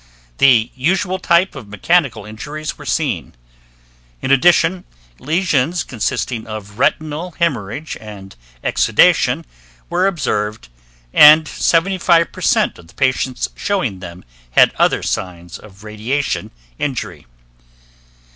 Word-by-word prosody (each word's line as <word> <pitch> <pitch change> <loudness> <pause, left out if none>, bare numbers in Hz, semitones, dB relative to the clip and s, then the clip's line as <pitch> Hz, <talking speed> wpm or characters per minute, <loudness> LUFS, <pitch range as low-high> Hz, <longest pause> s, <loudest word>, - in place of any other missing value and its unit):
The 120 -5 +4
usual 185 +7 -1
types 170 +1 +2
of 115 - -9
mechanical 125 - 0
injuries 145 +9 -6
were - - -12
seen. - - -2 0.8
In 130 - -2
addition, 175 +5 +3 0.4
lesions 160 -1 0
consisting 115 0 -3
of 105 0 -8
retinal 155 +5 -1
hemorrhage 145 - -2
and 100 -3 -11 0.3
exudation - - +2 0.5
were 180 +2 +2
observed 110 - -2 0.4
and 155 +1 +8
75% 170 +1 +1
of 85 - -16
the 85 - -20
patients 130 -1 -1
showing 155 - -2
them 85 -1 -10 0.2
had - - +4
other - - +2
signs 85 -2 -5
of 100 -1 -16
radiation 110 +7 -3 0.3
injury. 135 - -4
135 Hz, 105 wpm, -17 LUFS, 105-170 Hz, 0.8 s, and